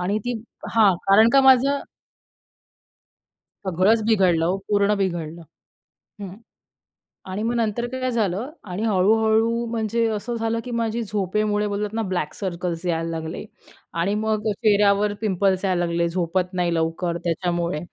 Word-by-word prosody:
आणि 195 +4 0
ती 245 - -1 0.4
हां, 210 -4 +5
कारण 215 +4 +6
का 275 - +6
माझं 265 +1 +4 1.9
सगळंच 190 +5 +2
बिघडलं 185 -7 +3
हो, 180 +3 0
पूर्ण 205 0 +3
बिघडलं. 170 -4 -3 0.8
हं, 190 -2 -7 1.0
आणि 205 +3 -3
मग 235 +2 0
नंतर 230 0 -1
काय 255 +1 -3
झालं 220 +1 -1 0.2
आणि 180 +4 -3
हळू-हळू 220 +3 +2
म्हणजे 230 0 0
असं 225 +4 -4
झालं 225 0 -1
की 250 - -6
माझी 230 +1 -1
झोपेमुळे 210 +1 -1
बोलतात 205 +1 -3
ना, 225 - -1
ब्लॅक 185 -7 -2
सर्कल्स 175 -2 -4
यायला 165 -1 -1
लागले 160 +3 -5 0.5
आणि 175 +4 0
मग 215 0 -1
अ, - - +1
चेहऱ्यावर 205 -1 +2
पिंपल्स 195 -2 +1
यायला 180 -2 +1
लागले 170 0 0
झोपत 180 +1 -1
नाही 175 -2 0
लवकर 165 +1 -1
त्याच्यामुळे, 170 -1 -1
200 Hz, 140 wpm, -23 LUFS, 175-220 Hz, 1.9 s, कारण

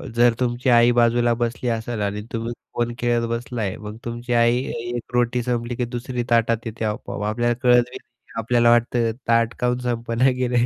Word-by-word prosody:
जर 120 0 +5
तुमची 125 +1 0
आई 120 +1 +6
बाजूला 120 0 +3
बसली 120 +1 -1
असेल 115 -1 -3
आणि 105 +1 -2
तुम्ही 115 +1 -3 0.2
फोन 120 0 -1
खेळत 120 -1 +1
बसलाय, 115 -4 -3
मग 105 0 -8
तुमची 120 +1 -4
आई 120 0 +4 0.2
एक 120 0 -5
रोटी 120 0 +1
संपली 120 0 -2
की 125 0 -1
दुसरी 120 +1 -4
ताटात 115 0 +2
येते 110 0 -4
आपोआप, 105 -1 -4
आपल्याला 120 +2 0
कळतही 125 0 +3
नाही. 120 - -24
आपल्याला 120 +1 +3
वाटतं 120 -1 +2 0.2
ताट 115 0 +3
का 125 - +1
म्हणून 125 0 -1
संपना 115 +2 +1
गेलंय. 125 -1 +1
120 Hz, 180 wpm, -22 LUFS, 115-120 Hz, 0.2 s, आई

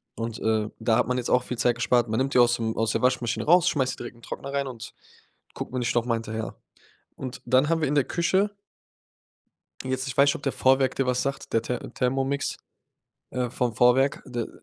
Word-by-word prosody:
Und, 115 -1 -4
äh, 110 -1 0
da 110 0 +2
hat 125 - +2
man 125 0 0
jetzt 125 - -2
auch 125 0 +4
viel 125 - -5
Zeit 120 0 +2
gespart. 120 0 +2
Man 110 +3 -1
nimmt 135 0 -1
die - - +6
aus 120 0 +5
dem 110 -1 -2
aus 115 -1 +1
der - - -1
Waschmaschine 120 -3 0
raus, 175 +2 +5
schmeißt 130 -4 0
die - - -10
direkt 120 0 -8
in 120 - -19
Trockner 140 +4 -7
rein 140 -1 0
und 115 -3 -8 0.6
guckt - - -6
man 130 - -2
nicht 120 - -1
nochmal 120 -1 +1
hinterher. 110 0 -5 0.6
Und 130 -2 -7
dann 130 +4 +3
haben 165 -1 +1
wir 155 - +1
in 145 - 0
der 140 - +4
Küche 195 +4 0 1.3
Jetzt 130 +1 -2
ich 130 - -4
weiß 140 +1 +6
nicht, 140 - +3
ob - - -8
der 135 - 0
Vorwerk 130 0 +2
dir 135 - 0
was 125 0 +1
sagt, 140 0 -4
der 115 - +3
Ther 125 - -2
Thermomix, 135 +2 -1 0.7
äh, 125 -1 -1
vom 120 -2 -1
Vorwerk, 125 +4 +3
der 120 -2 -4
125 Hz, 225 wpm, -26 LUFS, 120-135 Hz, 1.3 s, die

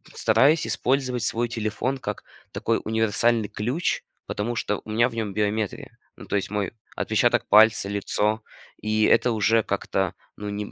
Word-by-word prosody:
стараюсь 155 +4 +3
использовать 130 -2 0
свой 120 +1 0
телефон 115 +4 -2
как 105 -4 -5 0.3
такой - - -1
универсальный 110 0 +1
ключ, 125 +11 -1 0.2
потому 115 +4 -3
что 105 -2 -2
у - - -11
меня 120 +3 +3
в - - -12
нем 110 -3 -3
биометрия. 105 0 -2 0.2
Ну, - - -11
то - - -3
есть 95 - -3
мой 105 -2 -2 0.2
отпечаток - - +1
пальца, 105 -1 +5
лицо. 105 +2 -1 0.4
И 110 0 +1
это 120 - +4
уже 115 +1 +2
как-то, 95 -2 -1 0.2
ну, 105 0 -5
не 105 0 -5
110 Hz, 155 wpm, -24 LUFS, 105-120 Hz, 0.4 s, пальца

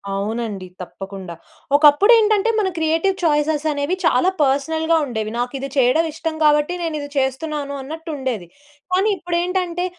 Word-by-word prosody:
అవునండి. 210 -2 -3
తప్పకుండా! 190 -1 -8 0.4
ఒకప్పుడేంటంటే, 415 +9 +5
మన 400 - +1
క్రియేటివ్ 325 +4 +1
చాయిసెసనేవి 300 0 +1
చాలా 325 +4 +3
పర్సనల్‌గా 320 +4 +1
ఉండేవి. 220 -4 -4
నాకు 245 +2 -2
ఇది 275 - -5
చేయడం 265 +6 +3
ఇష్టం 320 0 -4
కాబట్టి, 300 +2 +3
నేను 325 -2 -2
ఇది 285 0 -6
చేస్తున్నాను 280 +2 -2
అన్నట్టుండేది. 270 - -5 0.5
కానీ 390 +4 +3
ఇప్పుడేంటంటే, 355 +1 -1
300 Hz, 120 wpm, -20 LUFS, 260-335 Hz, 0.5 s, ఒకప్పుడేంటంటే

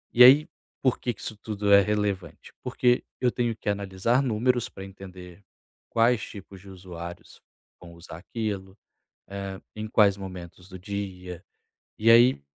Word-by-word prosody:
E 125 - +9
aí, 140 +5 +8 0.3
por 130 -2 +1
que 120 - -1
que - - -12
isso 110 - -5
tudo 105 -1 0
é 100 - +9
relevante? 100 -4 -3
Porque 125 0 +1 0.2
eu 125 -2 +2
tenho 120 -2 -1
que - - -13
analisar 100 +5 +1
números 120 0 +1
pra 95 0 -9
entender 95 -1 -12 0.5
quais 115 -1 +3
tipos 100 -2 -10
de 100 - -14
usuários 85 -2 -10 0.4
vão 85 -1 -12
usar 85 -1 -11
aquilo, 100 0 -5 0.5
eh, 100 -1 -6
em 110 0 -5
quais 100 -2 +4
momentos 90 -1 -9
do 95 -1 -10
dia. 95 -2 -6 0.5
E 115 +2 +3
aí 120 - +6
100 Hz, 155 wpm, -26 LUFS, 95-115 Hz, 0.5 s, E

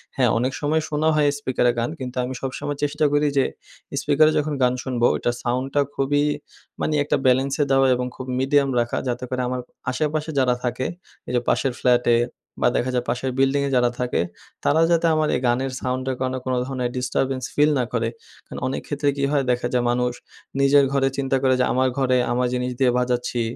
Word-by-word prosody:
হ্যাঁ, 125 -3 +3
অনেক 125 +3 0
সময় 155 +2 +1
শোনা 155 +1 0
হয় 150 -1 +3
স্পিকারে 125 -3 +1
গান 115 - 0
কিন্তু 125 -1 -6
আমি 125 +1 -4
সবসময় 140 +2 -4
চেষ্টা 150 +1 +1
করি 145 0 +3
যে, 135 - +4 0.6
স্পিকারে 155 +2 +4
যখন 150 0 0
গান 125 0 +3
শুনবো 125 -3 0
ওইটার 120 - -1
সাউন্ডটা 130 +3 0
খুবই 145 +2 +1 0.6
মানে 155 - 0
একটা 145 - +1
ব্যালেন্সে 135 +3 +3
দেওয়া 135 0 +4
এবং 125 0 -2
খুব 130 - -7
মিডিয়াম 140 +1 +2
রাখা 120 0 -1
যাতে 125 0 -2
করে 130 0 -2
আমার 125 0 -2 0.3
আশেপাশে 155 +4 -1
যারা 125 -2 +3
থাকে, 125 +1 -2 0.4
এই - - -4
যে, - - +4
পাশের 135 -2 +1
ফ্ল্যাটে 120 -1 +3 0.5
বা - - +4
দেখা 130 +1 0
যায় 125 0 0
পাশের 125 +2 -1
বিল্ডিংয়ে 140 +1 +2
যারা 125 -1 +4
থাকে 125 -6 0 0.4
তারা 160 +3 +3
যাতে 170 0 +3
আমার 155 0 +2
এই - - -1
গানের 130 +2 0
সাউন্ডের 130 0 -2
কারণ 130 0 -1
কোনো 130 -1 0
ধরনের 130 -2 -2
ডিস্টার্বেন্স 130 +1 -1
ফিল 150 +1 +4
না - - +2
করে। 115 -1 0 0.4
কারণ - - -8
অনেক 130 - -3
ক্ষেত্রে 145 -1 0
কি 140 - -1
হয়? 145 -2 +2
দেখা 120 0 0
যায় 125 -1 +2
মানুষ 125 0 0 0.5
নিজের 140 +1 +5
ঘরে 135 -1 +2
চিন্তা 135 -1 +1
করে 130 -1 +4
যে, 125 - +3
আমার 130 +1 +2
ঘরে 130 -2 +2
আমার 125 +1 +1
জিনিস 125 0 -1
দিয়ে 130 -2 +4
বাজাচ্ছি। 125 -1 0
130 Hz, 195 wpm, -23 LUFS, 125-140 Hz, 0.6 s, নিজের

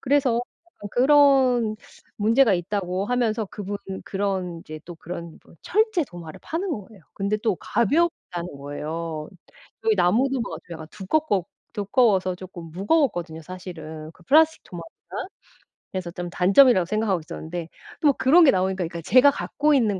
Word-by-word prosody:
그래서 260 -4 +2 0.5
그런 260 -4 +4 0.4
문제가 225 +1 +4
있다고 185 +1 -2
하면서 235 -2 0
그분 205 +1 -6 0.3
그런 190 -3 -2
인제 155 -1 -9
또 175 -1 -10
그런 170 0 -8
뭐 - - -19
철제 430 -4 +1
도마를 170 - -10
파는 345 +5 -3
거예요. 210 - -7
근데 200 +1 -1
또 215 -1 0
가볍다는 210 - -1
거예요. 155 +2 -5 0.6
여기 220 -1 +4
나무 210 +9 +3
도마가 250 -3 -3
좀 170 - -7
약간 160 -1 -9
두껍고 205 - 0 0.3
두꺼워서 200 -3 +2
쪼끔 180 -2 -10
무거웠거든요 180 - 0
사실은. 160 -3 -8
그 180 - -21
플라스틱 315 - +4
도마보다. 175 - -8 0.6
그래서 185 -2 -3
좀 175 0 -6
단점이라고 190 +3 +5
생각하고 210 -1 0
있었는데 160 +2 -7 0.3
또 290 -3 +5
그런 305 +7 +5
게 - - +7
나오니까 190 0 0
그니까 170 0 -5
제가 255 - +6
갖고 300 +2 0
있는 215 -7 +2
195 Hz, 345 characters per minute, -24 LUFS, 175-255 Hz, 0.6 s, 게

